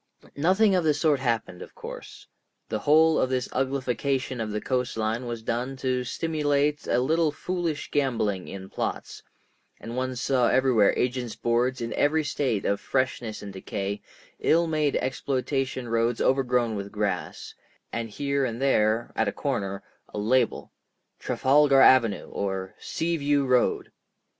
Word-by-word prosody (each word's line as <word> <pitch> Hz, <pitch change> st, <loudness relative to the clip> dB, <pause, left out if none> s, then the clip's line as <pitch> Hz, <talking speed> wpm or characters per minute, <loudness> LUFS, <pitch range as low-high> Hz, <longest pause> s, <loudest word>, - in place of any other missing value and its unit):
Nothing 190 Hz, +7 st, +3 dB
of 180 Hz, -2 st, +2 dB
the 155 Hz, -2 st, +3 dB
sort 150 Hz, -2 st, +2 dB
happened, 115 Hz, -8 st, -2 dB
of -, -, -11 dB
course; -, -, -9 dB, 0.4 s
the 110 Hz, -, -2 dB
whole 155 Hz, +6 st, +4 dB
of 130 Hz, -, +1 dB
this 130 Hz, -1 st, -1 dB
uglification 130 Hz, -1 st, -1 dB
of 110 Hz, -, -3 dB
the 105 Hz, 0 st, -2 dB
coast 125 Hz, 0 st, -2 dB
line 110 Hz, +3 st, -1 dB
was 115 Hz, -2 st, -5 dB
done 125 Hz, +4 st, -2 dB
to 130 Hz, -1 st, -1 dB
stimulate 150 Hz, 0 st, 0 dB
a -, -, +2 dB
little 155 Hz, +5 st, +2 dB
foolish 170 Hz, -2 st, -3 dB
gambling 115 Hz, -9 st, 0 dB
in 95 Hz, -1 st, -8 dB
plots, -, -, -4 dB, 0.6 s
and 115 Hz, +1 st, -7 dB
one 130 Hz, 0 st, -2 dB
saw 125 Hz, 0 st, +2 dB
everywhere 125 Hz, -5 st, +3 dB
agents' 125 Hz, -2 st, -1 dB
boards 120 Hz, +2 st, 0 dB
in 115 Hz, -, -3 dB
every 155 Hz, +2 st, +2 dB
state 130 Hz, -8 st, -1 dB
of 100 Hz, -, 0 dB
freshness 130 Hz, -5 st, -2 dB
and 100 Hz, -1 st, -7 dB
decay, 100 Hz, +1 st, -4 dB, 0.4 s
ill 170 Hz, +2 st, +3 dB
made 155 Hz, -3 st, 0 dB
exploitation 130 Hz, -1 st, -2 dB
roads 115 Hz, +1 st, +1 dB
overgrown 125 Hz, -4 st, +1 dB
with 100 Hz, 0 st, -5 dB
grass, 105 Hz, -2 st, -3 dB, 0.4 s
and 115 Hz, -1 st, -3 dB
here 140 Hz, +5 st, -1 dB
and 115 Hz, -2 st, -2 dB
there, 115 Hz, -4 st, +1 dB
at 110 Hz, -, +1 dB
a -, -, +1 dB
corner, 100 Hz, -9 st, -3 dB, 0.3 s
a -, -, -7 dB
label, 120 Hz, +3 st, +1 dB, 0.5 s
"Trafalgar 140 Hz, 0 st, +3 dB
Avenue," 115 Hz, -6 st, +5 dB
or 95 Hz, -1 st, -3 dB
"Sea 170 Hz, +1 st, -2 dB
View 145 Hz, -1 st, +1 dB
Road." 125 Hz, -1 st, +1 dB
130 Hz, 150 wpm, -26 LUFS, 115-140 Hz, 0.6 s, Avenue